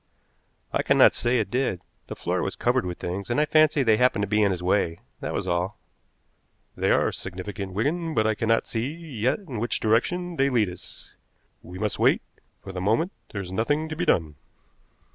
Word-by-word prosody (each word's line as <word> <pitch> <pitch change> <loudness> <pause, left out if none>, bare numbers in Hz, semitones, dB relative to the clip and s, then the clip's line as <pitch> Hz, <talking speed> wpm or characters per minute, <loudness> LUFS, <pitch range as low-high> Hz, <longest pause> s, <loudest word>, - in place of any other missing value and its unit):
"I - - +2
cannot - - +5
say 120 +1 +1
it 105 -4 -1
did. 125 -8 0 0.3
The - - -6
floor - - -1
was - - -2
covered - - +1
with 90 - -5
things, 95 +4 -5
and 120 - +1
I 150 - +4
fancy 155 -1 +4
they 110 -3 +4
happened 125 -4 +3
to - - -1
be 105 +2 +2
in 100 - +4
his 90 -2 -3
way, 90 -3 +1 0.2
that - - -4
was - - -3
all." 90 +3 -1 1.0
"They - - 0
are - - +3
significant, 95 +1 -6
Wigan, 160 - -1
but 110 - +2
I 110 - +3
cannot 115 +1 +1
see 115 +2 -2
yet 145 -7 -2
in 155 - -7
which 120 +2 -1
direction 170 +11 0
they 135 +1 +3
lead 115 -7 +2
us. 90 - -12 0.5
We 90 +2 -10
must 105 +1 -2
wait; - - +3 0.4
for 95 - -7
the 90 -1 -5
moment 115 - +1 0.2
there 100 - -4
is 90 -1 -8
nothing 145 +10 0
to 155 - -4
be 175 +3 -1
done." 80 - +1
110 Hz, 200 wpm, -25 LUFS, 95-140 Hz, 1.0 s, cannot